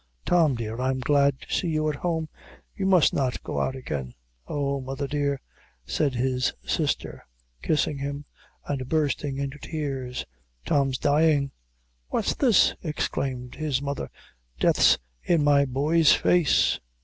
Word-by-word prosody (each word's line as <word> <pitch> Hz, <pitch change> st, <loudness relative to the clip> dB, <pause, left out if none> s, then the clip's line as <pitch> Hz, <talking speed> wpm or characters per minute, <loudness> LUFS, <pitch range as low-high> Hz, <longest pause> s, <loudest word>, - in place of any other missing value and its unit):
Tom, 165 Hz, -6 st, +3 dB
dear, 115 Hz, +1 st, -4 dB
I 130 Hz, -, +1 dB
am 130 Hz, 0 st, -1 dB
glad 140 Hz, +1 st, +2 dB
to -, -, -7 dB
see 180 Hz, -, 0 dB
you 155 Hz, -1 st, 0 dB
at 150 Hz, -2 st, -1 dB
home; 160 Hz, -2 st, -1 dB, 0.5 s
you 190 Hz, -, -2 dB
must 185 Hz, -4 st, +5 dB
not 130 Hz, -3 st, -1 dB
go -, -, -2 dB
out 130 Hz, -, -1 dB
again." 70 Hz, -, -5 dB, 0.3 s
"Oh, 140 Hz, -1 st, -1 dB
mother 135 Hz, +2 st, -4 dB
dear," 140 Hz, -1 st, -1 dB, 0.5 s
said 130 Hz, -, 0 dB
his 125 Hz, +1 st, 0 dB
sister, -, -, -2 dB, 0.4 s
kissing 150 Hz, -2 st, 0 dB
him, 140 Hz, +1 st, -4 dB, 0.4 s
and 130 Hz, -3 st, -3 dB
bursting 145 Hz, -3 st, 0 dB
into 140 Hz, +1 st, -4 dB
tears, 135 Hz, -6 st, -4 dB, 0.4 s
"Tom's 135 Hz, -2 st, +1 dB
dying!" 145 Hz, -1 st, +2 dB, 0.6 s
"What's -, -, 0 dB
this?" 240 Hz, -9 st, +4 dB
exclaimed 130 Hz, -5 st, -3 dB
his 150 Hz, -4 st, -1 dB
mother 140 Hz, -, -4 dB, 0.5 s
"death's -, -, +5 dB, 0.3 s
in 165 Hz, -4 st, +2 dB
my 145 Hz, -1 st, +4 dB
boy's 145 Hz, +4 st, +3 dB
face!" 175 Hz, -5 st, +3 dB
140 Hz, 140 wpm, -26 LUFS, 130-155 Hz, 0.6 s, must